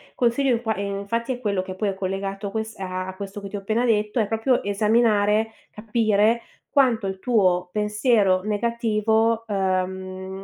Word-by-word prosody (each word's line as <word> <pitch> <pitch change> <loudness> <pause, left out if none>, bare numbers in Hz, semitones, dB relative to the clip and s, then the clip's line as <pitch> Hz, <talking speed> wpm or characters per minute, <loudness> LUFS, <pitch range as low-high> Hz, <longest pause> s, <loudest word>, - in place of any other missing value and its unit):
consiglio 245 +2 +2
in 230 - -1
qua 220 -2 -1
infatti 200 +5 -2
è 245 - -7
quello 200 -5 0
che 185 0 -6
poi 200 +1 -1
è - - -2
collegato 195 +1 -3
a 195 - -6
ques 220 0 -4
a 185 -1 -4
a 190 - -7
questo 200 +1 -7
che 200 - -7
ti 205 - -7
ho - - -2
appena 220 +5 0
detto, 215 0 +1
è 210 - +1
proprio 225 +4 +1
esaminare, 215 +1 +2 0.2
capire 220 +1 +1 0.3
quanto 245 -7 +3
il 190 0 -4
tuo 185 -7 +2
pensiero 210 -2 +2
negativo, 225 0 +1
ehm, 190 -1 -2
210 Hz, 170 wpm, -23 LUFS, 195-225 Hz, 0.3 s, quanto